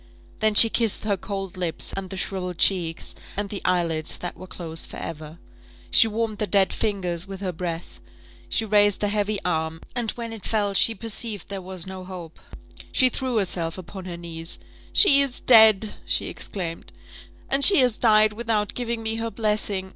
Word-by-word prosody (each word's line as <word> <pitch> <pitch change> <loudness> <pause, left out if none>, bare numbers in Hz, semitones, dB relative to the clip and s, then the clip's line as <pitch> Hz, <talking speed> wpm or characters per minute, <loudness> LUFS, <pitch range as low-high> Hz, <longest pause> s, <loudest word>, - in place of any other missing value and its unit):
Then 215 -1 +1
she 225 - +10
kissed 225 -2 +1
her 210 -2 0
cold 195 -1 -6
lips, 175 -3 -2
and 195 -1 -6
the 190 - -7
shrivelled 180 -2 -3
cheeks, 170 -4 0 0.2
and 205 -1 -3
the 200 - -5
eyelids 170 -4 0
that 175 - -6
were 185 - -11
closed 165 -3 -2
for - - -10
ever. 155 0 -8 0.5
She 225 - +6
warmed 220 -1 -3
the 210 - -1
dead 195 -2 +2
fingers 190 -5 -2
with 195 -1 -8
her 190 -2 -2
breath 165 - -6 0.5
she 225 - 0
raised 205 -1 +3
the 205 - 0
heavy 210 0 0
arm, 160 -2 -2 0.2
and 240 -3 -2
when 230 -1 -7
it 220 -4 -10
fell 205 -2 -1
she 225 +3 +3
perceived 225 0 -4
there 195 -1 -5
was 185 -2 -5
no 190 -1 -8
hope: 180 -3 -10 0.5
she 255 -2 +3
threw 255 -1 -3
herself 175 -4 -1
upon 185 +1 -9
her 175 -2 -7
knees: 165 -1 -6 0.3
"She 280 -9 +7
is 275 -3 -2
dead!" 220 -3 +5
she - - +2
exclaimed; 170 -4 -6 0.6
"and 275 +1 +1
she 395 - +9
has 245 -3 +2
died 215 -2 +4
without 215 -2 -2
giving 235 -2 -4
me 220 0 -1
her 230 0 -3
blessing! 210 -4 -2
200 Hz, 185 wpm, -23 LUFS, 180-220 Hz, 0.6 s, she